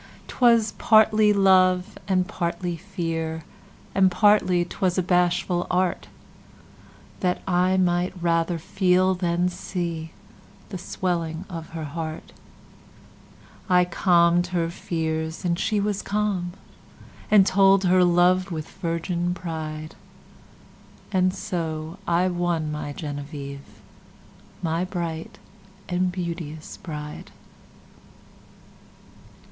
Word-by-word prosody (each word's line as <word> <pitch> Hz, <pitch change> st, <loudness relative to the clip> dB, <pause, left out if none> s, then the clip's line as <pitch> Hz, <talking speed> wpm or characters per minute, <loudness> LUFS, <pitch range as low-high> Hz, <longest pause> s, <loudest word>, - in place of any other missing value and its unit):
'Twas 235 Hz, -3 st, +3 dB
partly 215 Hz, -1 st, +5 dB
love, 185 Hz, -1 st, +4 dB
and 185 Hz, -2 st, +1 dB
partly 170 Hz, 0 st, -3 dB
fear. 165 Hz, -3 st, -4 dB, 0.5 s
And 190 Hz, -1 st, +4 dB
partly 185 Hz, -3 st, +3 dB
'twas 180 Hz, +1 st, -1 dB
a 185 Hz, -, +2 dB
bashful 175 Hz, 0 st, +1 dB
artThat 180 Hz, 0 st, -5 dB
I 185 Hz, +1 st, +2 dB
might 180 Hz, 0 st, +1 dB
rather 170 Hz, 0 st, +1 dB
feel, 185 Hz, +2 st, +2 dB
than 175 Hz, -1 st, 0 dB
see, 170 Hz, -3 st, -4 dB, 0.6 s
The 190 Hz, -4 st, -6 dB
swelling 170 Hz, -1 st, -3 dB
of 165 Hz, -2 st, -7 dB
her 165 Hz, -1 st, -4 dB
heart.I 165 Hz, +3 st, -5 dB
calm'd 175 Hz, 0 st, +3 dB
her 170 Hz, -2 st, -1 dB
fears, 160 Hz, 0 st, -3 dB
and 170 Hz, 0 st, 0 dB
she 215 Hz, -2 st, +1 dB
was 205 Hz, 0 st, -1 dB
calm. 200 Hz, -4 st, -1 dB, 0.8 s
And 205 Hz, -3 st, +6 dB
told 195 Hz, 0 st, +4 dB
her 185 Hz, 0 st, +4 dB
love 180 Hz, +2 st, +3 dB
with 155 Hz, -2 st, -5 dB
virgin 175 Hz, 0 st, -2 dB
pride; 155 Hz, -3 st, -6 dB, 1.2 s
And 185 Hz, -1 st, +3 dB
so 165 Hz, -3 st, -4 dB
I 175 Hz, +2 st, +2 dB
won 175 Hz, -3 st, -1 dB
my 150 Hz, -1 st, -4 dB
Genevieve, 145 Hz, -2 st, -7 dB, 0.8 s
My 165 Hz, +1 st, 0 dB
bright 175 Hz, +2 st, -5 dB, 0.5 s
and 180 Hz, 0 st, 0 dB
beauteous 170 Hz, -4 st, -6 dB
Bride. 150 Hz, -5 st, -7 dB
175 Hz, 100 wpm, -24 LUFS, 165-185 Hz, 1.2 s, And